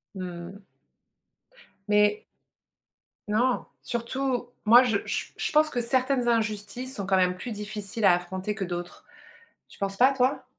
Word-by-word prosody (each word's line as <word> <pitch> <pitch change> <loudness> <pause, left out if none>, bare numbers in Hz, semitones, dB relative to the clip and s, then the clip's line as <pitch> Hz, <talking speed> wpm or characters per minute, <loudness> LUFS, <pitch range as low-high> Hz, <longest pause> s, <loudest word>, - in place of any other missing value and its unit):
Mmh. 180 +2 -7 1.2
Mais 210 0 +3 1.0
non. 240 +4 +1 0.2
Surtout 245 +1 -2 0.2
moi 240 +4 +8
je 225 -5 +1
je - - -2
je - - -2
pense 310 0 +4
que 245 -4 -1
certaines 255 +1 +1
injustices 230 +3 -1
sont 200 - -3
quand 190 -1 +2
même 180 0 +2
plus 235 +6 -7
difficiles 210 0 -4
à 185 - +7
affronter 185 +3 -3
que 195 -3 -3
d'autres. 175 0 -6 0.6
Tu - - -17
penses 195 0 -2
pas 265 +2 +5
toi? 260 +1 0
210 Hz, 140 wpm, -26 LUFS, 195-250 Hz, 1.2 s, moi